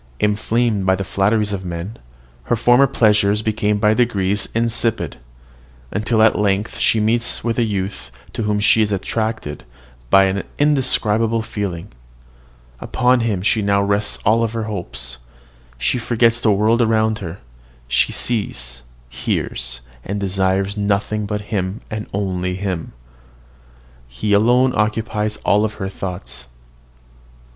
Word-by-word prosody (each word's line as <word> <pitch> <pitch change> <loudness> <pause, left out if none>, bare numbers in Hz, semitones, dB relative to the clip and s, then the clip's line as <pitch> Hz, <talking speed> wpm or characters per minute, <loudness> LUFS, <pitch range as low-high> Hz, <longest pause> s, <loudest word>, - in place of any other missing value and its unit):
Inflamed 105 0 +1
by 95 - +4
the 95 - -3
flatteries 105 +2 +1
of 95 -1 -4
men, 90 +5 -5 0.5
her - - +1
former 120 +4 +5
pleasures 105 -4 +3
become 105 -1 0
by 105 +1 +3
degrees 105 -4 +1
insipid, 115 0 0 0.9
till 115 -2 +3
at 110 - +4
length 100 +1 0
she 110 - +3
meets 115 +3 0
with 115 0 -1
a - - +3
youth 100 -3 -3 0.2
to - - -3
whom 105 -1 0
she 110 +2 +4
is 105 -1 +1
attracted 110 -5 -3 0.5
by 95 +6 +6
an 95 +1 0 0.2
indescribable 115 -6 +2
feeling; 100 -3 -5 0.9
upon 125 0 +2
him 105 -6 -1
she 110 +2 +2
now 100 0 +2
rests 100 +1 0
all 115 +2 +3
her 115 0 -4
hopes; 75 - -5 0.6
she 125 - 0
forgets 115 0 +2
the 110 - +3
world 110 +4 +3
around 110 -1 +2
her; 85 -2 -6 0.5
she 60 0 +2
sees, 65 - -2 0.3
hears, - - -3 0.4
desires 95 0 0
nothing 105 +1 -1
but 105 0 -2
him, 95 +1 -1
and 110 0 -4
him - - -27
only. 90 -2 -2 1.2
He 105 - -2
alone 125 +5 +4
occupies 110 0 -1
all 105 +2 +3
her 95 -2 -5
thoughts. 90 - -6
105 Hz, 130 wpm, -19 LUFS, 95-115 Hz, 1.2 s, by